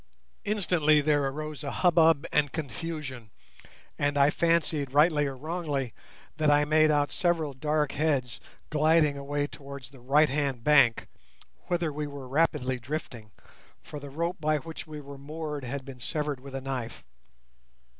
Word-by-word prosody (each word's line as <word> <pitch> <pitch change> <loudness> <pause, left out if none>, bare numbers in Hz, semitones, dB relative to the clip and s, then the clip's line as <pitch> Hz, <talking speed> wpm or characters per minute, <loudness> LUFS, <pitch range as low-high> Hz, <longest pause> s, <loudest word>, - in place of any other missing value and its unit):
Instantly 180 -7 +3
there 145 -1 +2
arose 155 +2 -5
a 140 - -3
hubbub 165 -3 +4
and 145 -2 +2
confusion, 145 -5 -5 0.7
and 145 0 +1
I 140 +1 +5
fancied, 160 -5 +1
rightly 150 -1 +4
or 135 -1 -5
wrongly, 150 -4 -3 0.4
that 155 -1 +2
I 145 0 +4
made 155 +1 +4
out 145 -1 +2
several 165 -5 0
dark 150 +1 0
heads 140 -5 -1 0.3
gliding 155 -1 +3
away 145 +1 -2
towards 140 -3 -10
the 135 - -15
right 140 +5 +4
hand 135 -4 -1
bank, 140 -5 +4 0.6
whither 170 -3 0
we 150 0 -3
were 140 -2 -8
rapidly 135 -3 +1
drifting, 120 -4 -6 0.5
for 150 - -8
the 140 0 -9
rope 170 +5 -2
by 155 0 +1
which 160 +3 -8
we 155 -1 -7
were 140 -1 -10
moored 150 0 -5
had 135 +2 -5
been 135 -2 -10
severed 145 +2 -2
with 135 +1 -9
a 135 - -3
knife. 130 -3 -5
145 Hz, 155 wpm, -28 LUFS, 135-155 Hz, 0.7 s, I